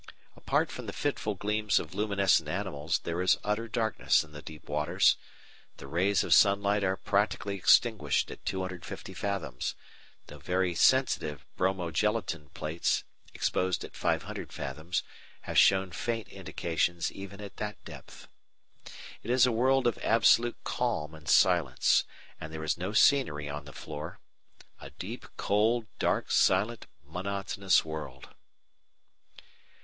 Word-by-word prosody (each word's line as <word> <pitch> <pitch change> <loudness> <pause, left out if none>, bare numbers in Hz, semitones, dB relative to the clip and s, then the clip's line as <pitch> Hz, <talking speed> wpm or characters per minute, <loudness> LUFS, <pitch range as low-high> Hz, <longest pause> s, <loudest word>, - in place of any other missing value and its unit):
Apart - - 0
from - - -7
the - - -5
fitful 105 -1 -1
gleams 105 +2 0
of 80 0 -2
luminescent 100 -5 +2
animals, 85 -3 -2
there 85 +1 -2
is 90 - +4
utter 105 +2 -1
darkness 110 -5 +1
in 80 - -16
the 75 0 -9
deep 75 0 -11
waters. 75 +6 +3 0.6
The - - -10
rays 95 +7 +1
of - - +3
sunlight 100 0 +4
are 95 0 +1
practically 100 +1 0
extinguished 100 - +3
at - - -11
250 95 -2 -5
fathoms, 100 -11 -3 0.5
though 75 - -12
very 90 +4 0
sensitive 85 - +2
bromogelatine 90 -2 -1
plates 80 +2 -1 0.3
exposed 90 -1 0
at - - -10
500 - - -2
fathoms 80 +7 -3 0.4
have - - -6
shown 95 -1 +4
faint 115 0 -3
indications 85 0 -2
even 100 +1 -9
at 100 -1 -9
that 105 -1 -6
depth. - - -12 0.9
It 110 - -9
is 125 +1 +5
a 125 - +2
world 130 +3 +2
of 120 - +1
absolute 115 +1 +3
calm 110 -12 -2
and 80 -1 -9
silence, - - +4 0.3
and 80 - -7
there 80 0 -6
is 80 - 0
no 90 +3 -4
scenery 110 - +3
on 70 0 -6
the 70 - -10
floor. 75 +4 -8 0.6
A - - -10
deep, - - -8
cold, 110 +3 +2
dark, - - 0
silent, 105 +5 +2 0.2
monotonous 95 +3 0
world! 75 -5 -7
95 Hz, 135 wpm, -29 LUFS, 80-105 Hz, 0.9 s, is